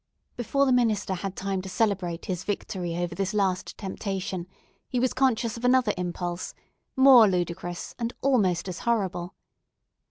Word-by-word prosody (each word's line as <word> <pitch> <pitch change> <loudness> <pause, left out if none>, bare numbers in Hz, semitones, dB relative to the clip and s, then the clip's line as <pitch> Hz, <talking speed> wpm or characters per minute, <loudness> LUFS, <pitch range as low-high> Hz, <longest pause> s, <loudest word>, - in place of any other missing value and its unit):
Before 275 +4 +1
the 265 - +2
minister 225 -6 +2
had 190 +1 -4
time 195 -1 -2
to 190 - -8
celebrate 185 -4 -1
his 180 -2 -3
victory 185 -4 -3
over 175 -1 -2
this 195 +3 -2
last 190 -3 0
temptation, 190 -2 -4 0.4
he 250 - 0
was 255 +1 +1
conscious 235 -4 +1
of 230 - -9
another 250 -3 +4
impulse, 175 0 -4 0.4
more 260 -4 +8
ludicrous, 175 -1 -3
and 235 0 -1
almost 195 -10 +2
as 185 -1 -5
horrible. 195 -6 -1
195 Hz, 150 wpm, -26 LUFS, 180-235 Hz, 0.4 s, more